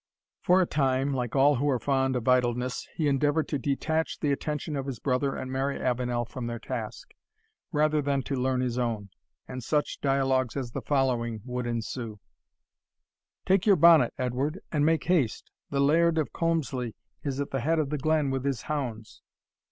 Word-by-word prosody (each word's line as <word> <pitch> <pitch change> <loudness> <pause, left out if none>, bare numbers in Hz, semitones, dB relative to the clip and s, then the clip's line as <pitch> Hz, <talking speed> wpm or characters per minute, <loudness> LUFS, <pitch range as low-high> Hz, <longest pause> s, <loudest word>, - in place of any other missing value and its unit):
For 180 +1 +4
a - - 0
time, 135 -2 +1
like 125 -2 -2
all 140 +1 +5
who 145 +4 +1
are 130 - +2
fond 135 +1 +1
of 125 -1 -3
idleness, 125 0 +1
he 155 - 0
endeavoured 145 +3 +2
to 145 - -1
detach 160 +4 -1
the 145 - +1
attention 150 +2 -2
of 135 -1 -3
his 135 -4 -4
brother 135 +3 0
and 130 - -5
Mary 135 +1 -1
Avenel 125 -1 -1
from 120 0 -6
their 120 0 -3
task, - - -6 0.6
rather 155 -1 +2
than 140 -1 0
to 140 - -3
learn 130 0 0
his 125 -1 -1
own, 110 -5 -2 0.4
and 125 -1 -6
such 150 +4 -1
dialogues 135 -2 +1
as 125 -3 -3
the - - -4
following 120 -5 0
would 125 -1 -3
ensue: 115 -1 -4 1.3
"Take 195 +3 +2
your 200 - +7
bonnet, 165 -1 +6
Edward, 135 +6 -1
and 150 -3 +1
make 160 +1 +2
haste 160 - 0 0.2
the 140 - -1
Laird 160 +4 +4
of 155 - -1
Colmslie 135 -8 -1 0.3
is 140 -2 -3
at 140 - -3
the 135 - -1
head 160 +6 +1
of 150 -3 0
the 150 - -1
glen 155 -1 +1
with 135 -1 -2
his 135 -4 -2
hounds." 120 -8 -4
135 Hz, 185 wpm, -28 LUFS, 125-150 Hz, 1.3 s, your